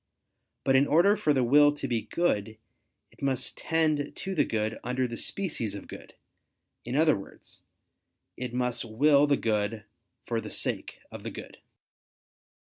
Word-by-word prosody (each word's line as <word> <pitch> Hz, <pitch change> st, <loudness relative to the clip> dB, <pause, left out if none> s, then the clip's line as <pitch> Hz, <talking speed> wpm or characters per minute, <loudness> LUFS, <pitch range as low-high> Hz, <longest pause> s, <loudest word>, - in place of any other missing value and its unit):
But 135 Hz, -, +3 dB
in 135 Hz, +2 st, +5 dB
order 175 Hz, +7 st, +5 dB
for 155 Hz, -, +1 dB
the 130 Hz, -3 st, +2 dB
will 145 Hz, +4 st, +6 dB
to 145 Hz, -2 st, -4 dB
be 120 Hz, -3 st, 0 dB
good, 110 Hz, -11 st, -1 dB, 0.5 s
it -, -, -23 dB
must 135 Hz, -2 st, -1 dB
tend 155 Hz, -3 st, 0 dB
to 195 Hz, -, -4 dB
the 160 Hz, -, +3 dB
good 110 Hz, 0 st, -2 dB
under 125 Hz, +1 st, -1 dB
the 120 Hz, -, -6 dB
species 135 Hz, -, -3 dB
of 100 Hz, -, -9 dB
good; -, -, -11 dB, 0.7 s
in 120 Hz, +2 st, -4 dB
other 155 Hz, +1 st, +4 dB
words, 100 Hz, -, -11 dB, 0.7 s
it 125 Hz, -1 st, -5 dB
must 125 Hz, -1 st, -1 dB
will 140 Hz, +6 st, +4 dB
the 140 Hz, -1 st, +3 dB
good 105 Hz, -1 st, -1 dB, 0.4 s
for 115 Hz, -1 st, -1 dB
the -, -, -7 dB
sake -, -, -3 dB
of -, -, -8 dB
the -, -, -5 dB
good. -, -, -10 dB
130 Hz, 160 wpm, -28 LUFS, 115-150 Hz, 0.7 s, will